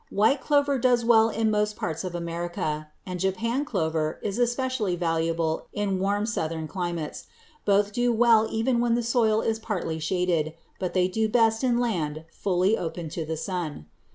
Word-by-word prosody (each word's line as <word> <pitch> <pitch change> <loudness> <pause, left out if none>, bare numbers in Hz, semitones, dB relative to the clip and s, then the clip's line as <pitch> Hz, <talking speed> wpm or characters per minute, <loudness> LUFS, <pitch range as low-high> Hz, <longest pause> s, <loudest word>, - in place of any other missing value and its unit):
White 240 +7 +2
clover 285 -2 +2
does 245 -1 +3
well 225 -1 +5
in 220 0 0
most 210 0 +1
parts 160 -2 -3
of 180 -2 -4
America, 170 -3 -3 0.2
and 180 -1 -5
Japan 225 +8 0
clover 160 - -1
is 205 +2 -2
especially 240 -5 0
valuable 165 -1 -1
in 200 -2 -1
warm 200 +2 +1
Southern 160 -7 -2
climates. 170 -4 -4 0.4
Both 205 0 +3
will - - -19
do 240 +3 +1
well 225 -1 +5
even 235 +2 +1
when 235 -1 +2
the 240 - 0
soil 225 -2 +2
is 220 0 -1
partly 180 -7 -3
shaded, 165 -1 0 0.3
but 180 -1 -3
they 180 -1 +3
do 220 +4 0
best 225 0 +3
in 245 -2 +2
land 160 -10 -1
fully 190 +2 +1
open 165 -3 -4
to 160 +1 -4
the 160 0 -2
sun. 165 - -4
195 Hz, 175 wpm, -26 LUFS, 170-230 Hz, 0.4 s, well